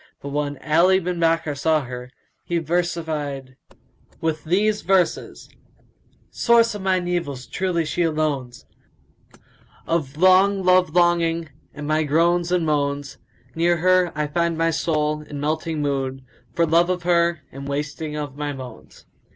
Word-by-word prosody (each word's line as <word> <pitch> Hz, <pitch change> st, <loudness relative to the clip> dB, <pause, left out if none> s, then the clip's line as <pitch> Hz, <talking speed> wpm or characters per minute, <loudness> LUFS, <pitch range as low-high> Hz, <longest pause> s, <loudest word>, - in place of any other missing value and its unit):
But 140 Hz, -, -7 dB
when 145 Hz, 0 st, -2 dB
Ali 175 Hz, +5 st, +4 dB
bin 180 Hz, -1 st, -3 dB
Bakkar 165 Hz, -3 st, +1 dB
saw 155 Hz, +2 st, +1 dB
her, 125 Hz, -1 st, -8 dB, 0.3 s
he 170 Hz, -, -2 dB
versified 155 Hz, -5 st, -2 dB, 0.6 s
with 160 Hz, -1 st, -2 dB
these 210 Hz, +5 st, +1 dB
verses, 185 Hz, -1 st, 0 dB, 0.8 s
"Source 230 Hz, -1 st, +3 dB
of 205 Hz, -, -6 dB
mine 185 Hz, -2 st, 0 dB
evils, 145 Hz, -8 st, -3 dB
truly, 175 Hz, +2 st, -1 dB
she 165 Hz, -, -2 dB
alone 155 Hz, -6 st, 0 dB
's, 125 Hz, -, -16 dB, 0.7 s
* -, -, -28 dB
Of 150 Hz, -4 st, -1 dB
long 190 Hz, +2 st, +4 dB
love 180 Hz, -2 st, +3 dB
longing 170 Hz, -2 st, +2 dB, 0.2 s
and 150 Hz, 0 st, -8 dB
my 155 Hz, +1 st, +2 dB
groans 170 Hz, +3 st, +2 dB
and 180 Hz, -2 st, +1 dB
moans; 145 Hz, -2 st, -1 dB, 0.3 s
Near 170 Hz, +1 st, +2 dB
her 180 Hz, 0 st, +3 dB
I 150 Hz, 0 st, -1 dB
find 170 Hz, +2 st, -1 dB
my 165 Hz, 0 st, +2 dB
soul 150 Hz, -1 st, -1 dB
in 150 Hz, -1 st, -8 dB
melting 155 Hz, +1 st, -2 dB
mood, 135 Hz, -2 st, -2 dB
* 120 Hz, -, -35 dB
For 170 Hz, -, +3 dB
love 170 Hz, +2 st, +3 dB
of 180 Hz, -1 st, -1 dB
her 170 Hz, -2 st, +2 dB
and 140 Hz, +1 st, -8 dB
wasting 150 Hz, +2 st, -4 dB
of 145 Hz, -3 st, -5 dB
my 145 Hz, 0 st, -3 dB
bones." 130 Hz, -4 st, -11 dB
160 Hz, 150 wpm, -22 LUFS, 145-175 Hz, 0.8 s, Ali